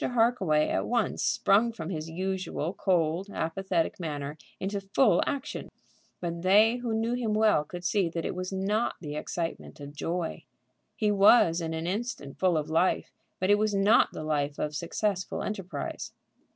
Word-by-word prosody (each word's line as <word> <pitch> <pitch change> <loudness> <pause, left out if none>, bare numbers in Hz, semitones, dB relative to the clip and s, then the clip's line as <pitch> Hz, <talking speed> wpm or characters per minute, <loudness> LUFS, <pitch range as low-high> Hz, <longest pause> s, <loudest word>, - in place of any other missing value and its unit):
Harkaway 225 -11 +2
at - - -1
once 235 -3 0
sprung 220 +4 +3
from 175 -5 -6
his 160 -2 -4
usual 185 -1 -3
cold, 180 0 0
apathetic 170 0 -1
manner 145 -3 -4 0.2
into 200 +1 -2
full 195 0 +3
action. 285 +1 -4 0.5
But 170 -1 -4
they 210 +6 +5
who 240 -2 -2
knew 225 +2 0
him 230 -4 -1
well 215 -8 +4
could 175 +3 -9
see 195 -2 +2
that 165 0 -4
it - - -2
was 185 +1 -4
not 200 +4 0
the 150 -3 -6
excitement 165 0 -4
of 145 0 -9
joy. 165 +2 -3 0.5
He 210 -1 +1
was 195 -4 +5
in 160 -1 -3
an 160 +1 -3
instant 190 - -4
full 180 -3 +3
of 150 - -2
life, 165 +4 +1 0.3
but 185 +2 +2
it 205 - +5
was 215 -1 +1
not 200 +4 +4
the - - -6
life 145 -2 -1
of 150 0 -3
successful 185 +4 -2
enterprise. 195 -3 -5
185 Hz, 165 wpm, -28 LUFS, 160-210 Hz, 0.5 s, they